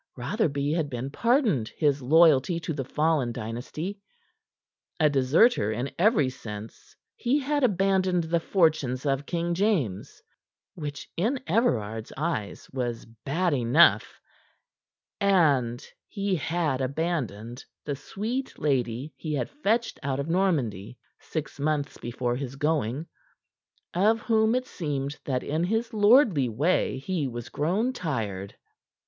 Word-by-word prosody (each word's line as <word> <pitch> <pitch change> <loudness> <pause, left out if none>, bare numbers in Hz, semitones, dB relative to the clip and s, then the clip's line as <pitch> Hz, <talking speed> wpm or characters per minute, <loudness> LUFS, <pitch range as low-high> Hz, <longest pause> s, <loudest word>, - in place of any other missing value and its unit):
Rotherby 145 - -1
had 160 -2 0
been 130 +1 -4
pardoned 225 - +2
his 145 -3 +2
loyalty 160 +3 +4
to 160 - -3
the 140 -2 -3
fallen 150 -2 +1
dynasty. 125 - -5 1.0
A 155 -2 +4
deserter 135 - +3
in 120 +5 -3
every 200 - +4
sense, 110 -4 -10 0.2
he 250 +4 +1
had 290 0 0
abandoned 190 -4 +2
the 165 +1 0
fortunes 155 -8 +1
of 140 0 0
King 170 0 -1
James 170 - -1 0.5
which 145 -4 -6
in 230 +10 +1
Everard's 115 - 0
eyes 150 -9 -3
was 120 -3 -3
bad 145 +10 -2
enough 135 +6 +4 1.0
and 145 -12 +2 0.2
he 200 -2 -1
had 160 -4 -1
abandoned 130 - -3 0.2
the 145 - -2
sweet 230 - -4
lady 130 0 -1
he 155 -2 -3
had 130 - -2
fetched 235 -5 0
out 135 -1 -2
of 140 - -2
Normandy 140 - 0 0.2
six 150 -3 -5
months 145 -1 -1
before 120 +1 -2
his 135 0 -5
going, 150 -1 -1 0.9
of 215 +6 +3
whom 220 0 +2
it 255 0 0
seemed 145 - -4
that 130 -2 -1
in 155 +3 -1
his 225 +5 -1
lordly 205 - +5
way 140 +5 +1
he 150 +1 -2
was 120 -2 -6
grown 195 - 0
tired. 110 - -4
150 Hz, 125 wpm, -27 LUFS, 130-185 Hz, 1.0 s, lordly